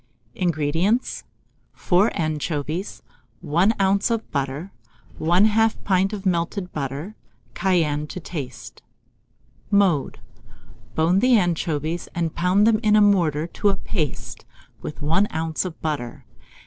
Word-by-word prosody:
INGREDIENTS. 170 - 0 0.5
4 190 +5 +2
anchovies, 155 +3 -3 0.4
1 180 +9 +2
oz. 195 +3 +2
of 230 -1 -2
butter, 140 +6 -3 0.5
1/2 210 +7 +3
pint 190 0 +2
of 205 -2 -6
melted 180 +1 -1
butter, 145 +7 -4 0.4
cayenne 155 -6 +1
to 180 - -7
taste. 155 -6 -7 0.9
Mode. 190 -9 +2 0.8
Bone 170 +4 +3
the 250 +1 +5
anchovies, 165 -3 -1
and 165 -2 -1
pound 180 +4 +3
them 220 -1 +4
in 215 -2 +3
a - - +6
mortar 170 -7 +3
to 200 +4 0
a 195 - +1
paste, 155 -9 -4 0.4
with 150 - -7
1 165 +7 +2
oz. 160 0 -2
of 175 -3 -6
butter. 145 -7 -4
175 Hz, 120 wpm, -23 LUFS, 155-200 Hz, 0.9 s, a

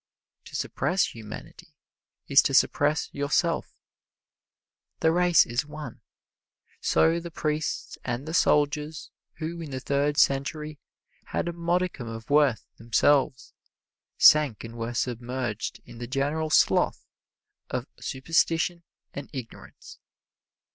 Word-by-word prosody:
To - - -10
suppress 180 -1 0
humanity 110 -2 -11 0.5
is - - +7
to - - 0
suppress 150 +1 +3
yourself. 150 +4 0 1.3
The 160 - +4
race 175 0 +5
is 120 +3 -1
one. 150 +1 -9 0.8
So 165 +1 +3
the 170 0 -7
priests 155 -1 -3
and 125 +5 -4
the 160 - -4
soldiers 150 -1 +1 0.2
who 165 +2 -5
in 160 - -7
the 130 -1 -4
Third 140 +2 0
Century 150 +2 +1 0.5
had - - -2
a 175 - -2
modicum 170 -5 -1
of 115 +2 -8
worth 145 -5 +3
themselves, 130 +4 +1 0.6
sank 150 -8 +6
and 115 0 -9
were 115 +1 -4
submerged 120 -2 -3
in 115 - -12
the 120 - -5
general 145 +5 -1
slough - - +3 0.6
of - - -3
superstition 165 +4 0 0.3
and 140 -1 -7
ignorance. 125 -4 -10
145 Hz, 115 wpm, -26 LUFS, 125-160 Hz, 1.3 s, is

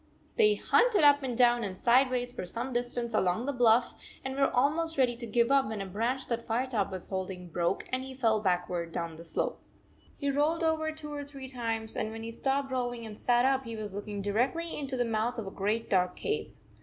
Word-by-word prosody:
They 425 -2 +5
hunted 470 -9 +3
up 290 0 +6
and 250 -3 -3
down 240 -1 +4
and 190 -2 -4
sideways 250 +1 +3
for 185 - -6
some 240 +7 -2
distance 240 -1 -1
along 190 +3 +1
the 285 - -1
bluff, 240 -1 +4 0.3
and 265 0 -3
were 275 0 +3
almost 315 +5 +1
ready 250 -3 +3
to 235 -1 -4
give 235 +3 +2
up, 275 -3 +4
when 215 -1 -4
a 195 - -3
branch 230 +7 -2
that 235 -1 -2
Firetop 230 -3 0
was 185 -2 -7
holding 185 -2 -4
broke 170 +1 -1
and 255 - +1
he 265 0 -8
fell 225 -4 +2
back 180 -3 +1
ward 170 -2 -3
down 165 -1 -4
the 165 - -10
slope. 165 - -3 0.6
He 280 0 -1
rolled 305 +4 +1
over 315 -1 +1
two 305 -1 -7
or 290 0 -4
three 275 -2 -8
times, 230 -3 -1
and 215 - -1
when 225 0 -6
he 230 - -5
stopped 270 +3 -1
rolling 245 -2 -2
and 215 -1 -7
sat 240 +3 +2
up 270 0 +2
he 230 -2 -6
was 210 -3 -5
looking 205 0 -5
directly 255 +11 0
into 275 -3 -3
the 245 - +1
mouth 230 +2 -1
of 225 - -4
a 195 - -6
great 210 +4 -1
dark 180 -2 +2
cave. 435 0 -2
240 Hz, 225 wpm, -30 LUFS, 215-270 Hz, 0.6 s, up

